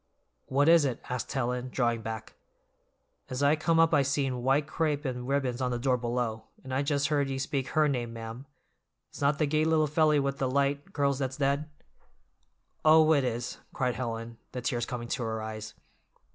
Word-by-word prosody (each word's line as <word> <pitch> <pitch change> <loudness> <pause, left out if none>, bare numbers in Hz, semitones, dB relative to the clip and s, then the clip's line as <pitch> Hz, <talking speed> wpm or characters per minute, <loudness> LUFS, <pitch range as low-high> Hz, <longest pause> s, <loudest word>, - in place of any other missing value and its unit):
"What 140 +3 +2
is 165 -1 +7
it?" 130 -4 -1
asked 125 -1 -3
Helen, 125 -1 -2
drawing 120 -2 0
back. 110 0 -6 1.0
"As 130 +2 -2
I 145 +2 +5
come 165 +1 +1
up 165 0 +4
I - - +5
seen 135 -2 0
white 135 +4 +2
crape 155 -1 -1
and 125 -1 -3
ribbons 135 -2 0
on 125 - +1
the 120 - -1
door 125 +1 +2
below, 120 -2 -2 0.2
and 130 0 -6
I 135 - +1
just 145 0 0
heard 145 -2 +1
ye 135 - -2
speak 135 0 -2
her 155 -1 +5
name, 120 -5 -2
ma'am; 115 +3 -8 0.6
it's - - -11
not 140 +1 +3
the 155 - +2
gay 155 +2 +1
little 160 -1 +3
felly 150 0 +3
with 140 0 -1
the 130 - 0
light 140 +6 0
curls 140 -2 +1
that's 130 -1 -2
dead?" 140 +2 0 1.1
"Oh, 160 0 +6
it 140 -3 +3
is," 120 0 -3 0.2
cried 125 -2 0
Helen, 115 -2 -5
the 125 - -4
tears 120 -2 -1
coming 120 -2 -5
to 130 - -2
her 110 -1 -2
eyes. 110 0 -6
135 Hz, 195 wpm, -29 LUFS, 120-145 Hz, 1.1 s, is